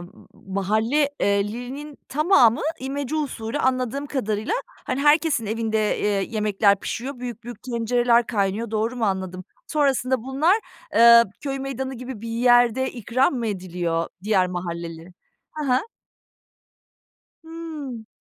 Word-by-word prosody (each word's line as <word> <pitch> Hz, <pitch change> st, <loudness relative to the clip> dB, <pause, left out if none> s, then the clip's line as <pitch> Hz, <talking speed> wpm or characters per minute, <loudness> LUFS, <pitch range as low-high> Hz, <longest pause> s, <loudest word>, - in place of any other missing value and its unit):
m -, -, -8 dB, 0.5 s
mahalle 220 Hz, +9 st, +2 dB
eee, 200 Hz, +1 st, +1 dB
linin 270 Hz, +5 st, -7 dB
tamamı, 295 Hz, -, +4 dB, 0.2 s
imece 275 Hz, +2 st, -3 dB
usulü 265 Hz, -4 st, -3 dB
anladığım 260 Hz, +1 st, 0 dB
kadarıyla. 220 Hz, -, -2 dB
Hani, 255 Hz, +1 st, -5 dB
herkesin 295 Hz, -5 st, +3 dB
evinde, 220 Hz, -1 st, 0 dB
eee, -, -, -1 dB, 0.2 s
yemekler 210 Hz, -2 st, +3 dB
pişiyor, 255 Hz, +2 st, -4 dB
büyük 240 Hz, -2 st, -7 dB
büyük 240 Hz, -3 st, -9 dB
tencereler 240 Hz, -1 st, +2 dB
kaynıyor 205 Hz, +1 st, -1 dB
doğru 225 Hz, +3 st, -1 dB
mu 235 Hz, -, 0 dB
anladım? 190 Hz, -2 st, -2 dB, 0.2 s
Sonrasında 265 Hz, -4 st, +1 dB
bunlar, 275 Hz, +8 st, +2 dB, 0.4 s
eee, 235 Hz, 0 st, +8 dB, 0.2 s
köy 275 Hz, -1 st, -3 dB
meydanı 265 Hz, 0 st, -4 dB
gibi 250 Hz, -2 st, -7 dB
bir 230 Hz, -, -6 dB
yerde 245 Hz, +2 st, +3 dB
ikram 250 Hz, +3 st, +1 dB
mı 240 Hz, -3 st, -2 dB
ediliyor, 175 Hz, -4 st, -2 dB, 0.2 s
diğer 195 Hz, -4 st, +3 dB
mahalleli? 170 Hz, -1 st, -6 dB, 0.4 s
Hı 305 Hz, -1 st, -4 dB
hı. 250 Hz, -, +5 dB, 1.7 s
Hıı. 310 Hz, -8 st, -7 dB
235 Hz, 125 wpm, -23 LUFS, 210-265 Hz, 1.7 s, eee